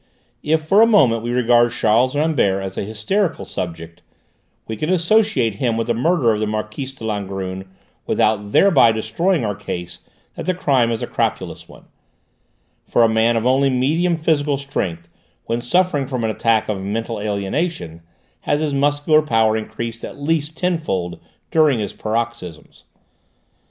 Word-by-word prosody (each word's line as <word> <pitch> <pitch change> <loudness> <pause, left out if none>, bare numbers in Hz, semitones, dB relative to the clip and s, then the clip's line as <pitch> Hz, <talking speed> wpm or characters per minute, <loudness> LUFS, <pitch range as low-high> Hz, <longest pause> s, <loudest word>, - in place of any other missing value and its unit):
If 155 +1 +1
for 195 +7 +4
a 230 - +7
moment 130 - +4
we 120 - -4
regard 120 -1 +3
Charles 120 +4 +2
Rambert 140 -11 +1
as 95 -1 -6
a - - -3
hysterical 135 - -2
subject, 85 -2 -6 0.7
we 110 - -4
can 155 +9 -3
associate 170 - +2
him 115 -2 0
with 115 - -1
the 120 - 0
murder 130 0 +2
of 105 - -2
the 110 - -1
Marquise 110 +5 -4
de 135 -4 -10
Langrune 95 -3 -4 0.4
without 105 -1 +1
thereby 175 - +5
destroying 115 - 0
our 105 - -1
case 90 -3 -6 0.3
that - - -7
the 185 - +1
crime 130 -9 +2
is 115 - -3
a - - 0
crapulous - - -3
one, - - -16 1.0
for 120 - +3
a - - +6
man 110 +1 +2
of 115 - -2
only 135 +2 +3
medium 160 +7 +1
physical 150 -3 +1
strength, 90 -12 -4 0.4
when 115 +1 -2
suffering 150 +1 +1
from 130 -3 -3
an 110 - 0
attack 110 0 +1
of 100 -3 -3
mental 110 +3 -3
alienation, 100 - -3 0.4
has 145 - -1
his 155 -2 -1
muscular 145 +2 +3
power 115 -6 +2
increased 115 +1 -5
at - - -8
least 155 +1 -1
tenfold 155 - -2 0.3
during 155 -5 +4
his 105 -2 -4
paroxysms. 110 -7 -5
120 Hz, 160 wpm, -20 LUFS, 105-150 Hz, 1.0 s, a